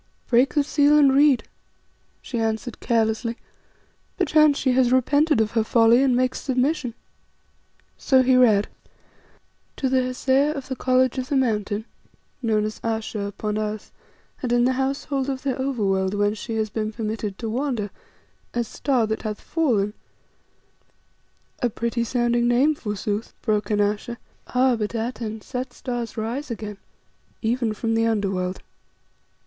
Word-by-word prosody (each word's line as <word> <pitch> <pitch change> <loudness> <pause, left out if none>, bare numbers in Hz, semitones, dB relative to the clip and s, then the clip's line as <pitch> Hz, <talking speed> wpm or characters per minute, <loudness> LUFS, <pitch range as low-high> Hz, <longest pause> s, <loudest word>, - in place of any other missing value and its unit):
"Break 250 +4 +3
the 295 - +4
seal 290 +1 +4
and 280 -3 +5
read," 280 -2 +4 0.8
she 240 - -4
answered 225 +2 -2
carelessly. 230 0 0 0.8
"Perchance 305 -5 +4
she 260 - +1
has 250 -1 +3
repented 285 +3 +3
of 220 -1 +1
her 225 -2 +1
folly 230 +2 +4
and 265 -2 +3
makes 255 +1 0
submission." 260 -1 0 1.0
So 260 -1 +4
he 255 0 +4
read 220 -5 +5 1.1
"To 265 - -1
the 260 0 +3
Hesea 265 +3 +1
of 275 -2 -7
the 260 - -2
College 255 0 +2
on 255 - -2
the 280 - -2
Mountain, 215 -4 0 0.6
known 215 -3 +1
as 215 0 -6
Ayesha 225 -1 -2
upon 210 +1 -3
earth, 215 0 -4 0.5
and 250 - -2
in 240 0 +3
the 260 - +2
household 270 +1 -1
of 265 -1 -4
the 270 -2 0
Over 260 -5 -1
world 190 0 +1
whence 205 +1 0
she 225 - -5
has 215 -1 -1
been 215 -1 -2
permitted 215 -2 -4
to 230 - -5
wander, 235 -3 -2 0.6
as 240 -1 0
'Star 255 -3 0
that 220 0 -3
hath 215 -1 -4
fallen 225 -11 0 0.8
'" - - -40
"A 245 - +2
pretty 235 +1 -2
sounding 240 0 +1
name, 255 +6 +4
forsooth," 210 -3 -4
broke 210 -2 0
in 210 -1 +1
Ayesha; 210 +3 -1 0.3
"ah! 255 0 +3
but, 215 0 -3
Atene, 225 -1 -4
set 250 +2 -5
stars 240 -3 -5
rise 235 +7 -3
again 215 -3 -6 0.7
even 230 0 0
from 225 +1 -2
the 225 0 +2
Under 205 -3 0
world. 185 0 -3
235 Hz, 155 wpm, -23 LUFS, 215-260 Hz, 1.1 s, and